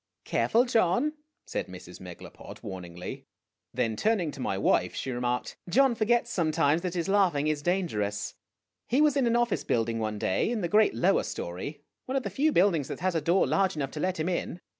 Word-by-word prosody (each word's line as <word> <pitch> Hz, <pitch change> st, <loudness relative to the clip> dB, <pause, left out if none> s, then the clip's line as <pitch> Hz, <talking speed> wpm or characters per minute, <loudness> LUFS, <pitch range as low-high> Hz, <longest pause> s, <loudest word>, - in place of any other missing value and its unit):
" -, -, -55 dB
Careful, 235 Hz, +3 st, +2 dB
John," 240 Hz, -, +2 dB, 0.3 s
said -, -, -3 dB
Mrs. -, -, -11 dB
Megalopod, -, -, -11 dB
warningly. 90 Hz, -3 st, -7 dB, 0.4 s
Then 110 Hz, -1 st, -1 dB
turn 220 Hz, -, +2 dB
ing 165 Hz, -4 st, -2 dB
to -, -, -11 dB
my 95 Hz, -, -1 dB
wife 100 Hz, -, +2 dB
she 135 Hz, -, -3 dB
remarked, 125 Hz, 0 st, -2 dB
" -, -, -13 dB
John 265 Hz, +5 st, +4 dB
forgets 235 Hz, +1 st, +1 dB
sometimes 160 Hz, -3 st, +2 dB
that 180 Hz, -1 st, -3 dB
his 170 Hz, 0 st, -1 dB
laughing 190 Hz, -8 st, +2 dB
is 155 Hz, -1 st, 0 dB
dangerous. 110 Hz, -, -1 dB, 0.5 s
He 250 Hz, +5 st, +2 dB
was 300 Hz, -2 st, +4 dB
in 270 Hz, -4 st, +2 dB
an 235 Hz, -, +2 dB
office 240 Hz, -2 st, +1 dB
building 115 Hz, 0 st, 0 dB
one 110 Hz, -1 st, -2 dB
day 95 Hz, -, 0 dB
in 235 Hz, -2 st, -1 dB
the 175 Hz, -, 0 dB
great 210 Hz, -, +4 dB
lower 115 Hz, -, +3 dB
story, 140 Hz, -, -6 dB, 0.2 s
one 260 Hz, -, -2 dB
of 270 Hz, -, +1 dB
the -, -, -4 dB
few 305 Hz, +3 st, +2 dB
buildings 170 Hz, -, +3 dB
that -, -, -6 dB
has 185 Hz, 0 st, +1 dB
a 165 Hz, -, 0 dB
door 170 Hz, +5 st, +3 dB
large 195 Hz, -3 st, +1 dB
enough 135 Hz, -3 st, -3 dB
to 150 Hz, -, -6 dB
let 185 Hz, +1 st, -1 dB
him 155 Hz, -, -1 dB
in. 180 Hz, -1 st, -2 dB
170 Hz, 210 wpm, -28 LUFS, -, 0.5 s, John